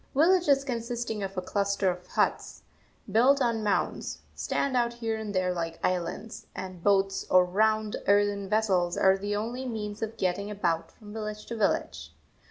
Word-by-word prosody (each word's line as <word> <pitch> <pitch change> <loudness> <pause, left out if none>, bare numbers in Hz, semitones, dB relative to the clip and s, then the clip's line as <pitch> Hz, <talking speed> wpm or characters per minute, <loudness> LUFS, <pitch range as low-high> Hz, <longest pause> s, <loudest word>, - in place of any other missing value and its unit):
Villages 310 -3 +4
consisting 235 -3 -3
of 195 -1 -5
a 185 - -1
cluster 200 -1 +1
of 180 0 -9
huts, - - -1 0.5
built 260 +5 +5
on 230 -4 +1
mounds, 205 - -1
stand 275 -2 -1
out 240 -1 +2
here 225 -2 -2
and 220 -1 -5
there 185 -1 +1
like 165 -1 -3
islands, 185 +5 -2
and 185 -2 -7
boats 195 -1 +2
or 185 0 +6
round, 215 +3 +1
earthen 200 -1 +2
vessels 190 -5 +1
are 190 0 +5
the 205 +1 -3
only 240 +5 -3
means 210 -3 -5
of 225 0 -4
getting 195 +1 -1
about 175 -5 -1
from 210 -2 -13
village 215 -1 -5
to 235 - -5
village. 80 - -1
205 Hz, 165 wpm, -28 LUFS, 190-225 Hz, 0.5 s, or